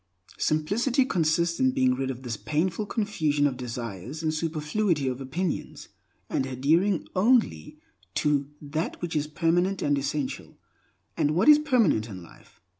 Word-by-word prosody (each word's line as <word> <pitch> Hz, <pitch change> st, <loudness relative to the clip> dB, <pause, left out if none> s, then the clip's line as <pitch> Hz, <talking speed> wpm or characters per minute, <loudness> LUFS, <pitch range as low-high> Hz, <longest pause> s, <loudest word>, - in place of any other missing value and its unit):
Simplicity 225 Hz, -, +1 dB
consists 170 Hz, -4 st, +1 dB
in 260 Hz, 0 st, +3 dB
being 130 Hz, -, +3 dB
rid 135 Hz, +1 st, -2 dB
of 130 Hz, 0 st, -6 dB
this 120 Hz, -3 st, -3 dB
painful 170 Hz, -, -1 dB
confusion 155 Hz, -11 st, 0 dB
of 140 Hz, -3 st, +1 dB
desires 120 Hz, -, -6 dB
and 155 Hz, -1 st, 0 dB
superfluity 155 Hz, 0 st, -1 dB
of 130 Hz, +1 st, -3 dB
opinions, 160 Hz, +6 st, -4 dB, 0.4 s
and 130 Hz, -, -1 dB
adhering 160 Hz, +9 st, +1 dB
only 195 Hz, -, +2 dB, 0.4 s
to 145 Hz, -2 st, +1 dB
that 155 Hz, +3 st, -4 dB
which 175 Hz, -2 st, -4 dB
is 150 Hz, 0 st, 0 dB
permanent 175 Hz, +5 st, +1 dB
and 145 Hz, -1 st, +2 dB
essential. 140 Hz, 0 st, -4 dB, 0.6 s
And 150 Hz, +1 st, +1 dB
what 190 Hz, -, +2 dB
is 300 Hz, 0 st, +9 dB
permanent 230 Hz, -, +2 dB
in 95 Hz, -4 st, -8 dB
life? 85 Hz, -, -18 dB
155 Hz, 145 wpm, -26 LUFS, 135-185 Hz, 0.6 s, is